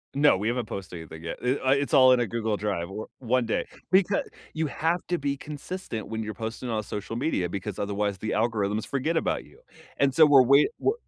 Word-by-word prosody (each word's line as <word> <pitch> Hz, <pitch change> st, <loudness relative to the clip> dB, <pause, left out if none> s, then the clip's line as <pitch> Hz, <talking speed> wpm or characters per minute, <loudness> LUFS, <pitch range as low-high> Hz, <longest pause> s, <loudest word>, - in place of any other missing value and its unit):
No, 145 Hz, -8 st, +5 dB
we 105 Hz, +3 st, -2 dB
haven't 120 Hz, -1 st, -1 dB
posted 95 Hz, -4 st, -7 dB
anything 80 Hz, 0 st, -10 dB
yet. 85 Hz, -, -5 dB
Eh, 125 Hz, +2 st, +2 dB
uh, 130 Hz, -, +1 dB
it's 140 Hz, +3 st, +1 dB
all 130 Hz, -2 st, +8 dB
in 125 Hz, -, +3 dB
a 120 Hz, -, +2 dB
Google 110 Hz, -1 st, -1 dB
Drive. 95 Hz, -4 st, -2 dB
Or 105 Hz, +3 st, -6 dB
one 125 Hz, -1 st, +1 dB
day 110 Hz, -, -1 dB, 0.3 s
becau 195 Hz, +1 st, +4 dB, 0.3 s
you 160 Hz, 0 st, -1 dB
have 165 Hz, +4 st, -1 dB
to 175 Hz, -1 st, 0 dB
be 140 Hz, -1 st, -1 dB
consistent 150 Hz, -, -6 dB
when 110 Hz, 0 st, -3 dB
you're 110 Hz, 0 st, -5 dB
posting 115 Hz, +3 st, -5 dB
on 110 Hz, -1 st, 0 dB
social 105 Hz, +3 st, -5 dB
media 120 Hz, -, 0 dB
because 100 Hz, +2 st, -5 dB
otherwise, 100 Hz, -1 st, -1 dB
the 110 Hz, +3 st, -4 dB
algorithms 110 Hz, -2 st, 0 dB
forget 140 Hz, +5 st, -1 dB
about -, -, -1 dB
you, -, -, -19 dB, 0.4 s
and 135 Hz, -2 st, +2 dB
so, 160 Hz, +1 st, +7 dB
we're 140 Hz, -3 st, +7 dB
wait 140 Hz, -, +5 dB
we're 410 Hz, -, +2 dB
115 Hz, 220 wpm, -26 LUFS, 105-140 Hz, 0.4 s, all